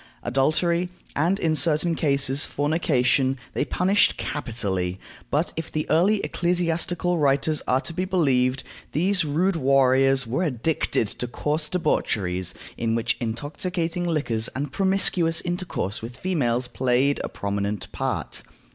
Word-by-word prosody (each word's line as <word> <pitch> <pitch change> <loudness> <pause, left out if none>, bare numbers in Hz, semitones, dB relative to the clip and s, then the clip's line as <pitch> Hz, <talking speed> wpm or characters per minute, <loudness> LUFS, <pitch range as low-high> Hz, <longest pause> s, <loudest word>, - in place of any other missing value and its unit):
Adultery, 165 +7 +1 0.3
and, 170 +7 +2
in 160 -4 +1
certain 155 +3 +2
cases, 140 -3 +2
fornication, 140 -3 +1 0.2
they - - 0
punished 185 +6 +2
capitally; 100 - -2 0.3
but, 150 +4 0
if 165 0 -5
the 155 0 -2
early 195 +6 +3
ecclesiastical 175 0 0
writers 145 +1 +2
are 130 +1 +2
to 170 - -6
be 180 - -1
believed, 135 -8 +1 0.3
these 180 +4 +2
rude 170 +6 +1
warriors 135 -2 +3
were 120 +9 -1
addicted 145 - 0
to 125 - -4
coarse 150 +5 -2
debaucheries, 95 - 0 0.2
in 115 -1 0
which 115 - 0
intoxicating 165 +9 -3
liquors 120 -9 0
and 145 +3 -3
promiscuous 190 -4 +2
intercourse 175 - -3
with 120 +2 -8
females 125 -10 0
played 130 +3 +1
a - - -3
prominent 100 0 -3
part. - - -2
145 Hz, 130 wpm, -24 LUFS, 125-170 Hz, 0.3 s, early